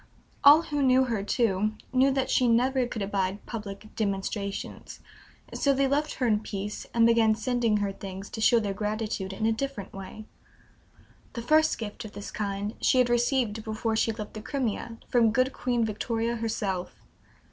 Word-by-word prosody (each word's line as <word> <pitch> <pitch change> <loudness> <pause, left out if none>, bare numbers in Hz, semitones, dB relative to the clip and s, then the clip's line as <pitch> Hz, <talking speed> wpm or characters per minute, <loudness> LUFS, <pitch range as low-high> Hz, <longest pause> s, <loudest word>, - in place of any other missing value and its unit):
All 295 +3 +8
who 295 -3 -2
knew 260 -1 +5
her, 230 -5 -1
too, 210 -1 +1 0.2
knew 260 +1 +5
that 270 -1 0
she 250 - +3
never 250 +2 +2
could 220 -4 -4
abide 195 0 -2
public 210 -2 -7
"demonstrations"; 200 -1 -3 0.5
so 280 -1 +2
they 275 +1 +2
left 295 +3 0
her 255 - -1
in 215 -3 +3
peace, 210 -1 -5
and 230 -1 +4
began 230 -2 +4
sending 230 -1 +1
her 205 -1 -1
things, 195 0 -8
to 220 - -5
show 235 +1 +5
their 205 -3 -2
gratitude 210 -1 -3
in 215 +3 -3
a 225 - +3
different 225 -4 -4
way. 195 +3 -9 1.1
The 235 - -5
first 310 +5 +3
gift 210 -3 -6
of 215 -1 -9
this 205 - -7
kind 205 0 -3
she - - +3
had 250 -1 +4
received 240 -3 +1
before 220 +1 -2
she 225 - +2
left 210 -1 -7
the 215 - -7
Crimea, 230 -3 -3
from 230 -3 +3
good 255 +3 +1
Queen 240 -2 0
Victoria 225 +2 -2
herself. 210 -5 -3
225 Hz, 175 wpm, -27 LUFS, 205-250 Hz, 1.1 s, All